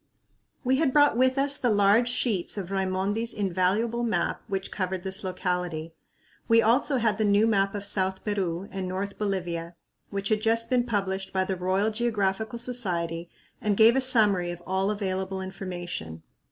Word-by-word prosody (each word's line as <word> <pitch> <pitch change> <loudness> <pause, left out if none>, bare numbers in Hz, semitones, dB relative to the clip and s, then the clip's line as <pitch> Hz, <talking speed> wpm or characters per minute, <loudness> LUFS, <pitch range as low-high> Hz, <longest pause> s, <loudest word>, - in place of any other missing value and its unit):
We 260 +1 +2
had 280 -3 +1
brought 290 -4 +5
with 260 +2 +2
us 280 +1 +2
the 245 - +1
large 210 +3 +4
sheets 220 -7 0
of 190 -2 -5
Raimondi's 195 +4 -1
invaluable 205 +4 0
map 235 -2 -1
which 195 -1 -3
covered 185 -2 -3
this 190 +1 -3
locality. 180 -3 -3 0.5
We 230 0 +5
also 245 +5 +3
had 220 -3 +1
the - - +2
new 205 +1 +4
map 200 -2 +1
of 205 0 -4
South 190 -1 -1
Peru 195 -3 -2
and 190 -1 -4
North 195 +2 -4
Bolivia 175 -4 -3 0.3
which 200 0 -3
had 215 -1 +1
just 230 +1 +1
been 245 -1 +3
published 195 -3 -2
by 190 0 +1
the 190 0 -2
Royal 190 +4 0
Geographical 220 -1 -1
Society 175 -9 0 0.3
and 210 -2 0
gave 225 +2 +7
a 265 - +3
summary 210 -9 +3
of 175 0 -7
all 190 +1 0
available 190 -2 -2
information. 175 - -6
200 Hz, 165 wpm, -26 LUFS, 185-225 Hz, 0.5 s, gave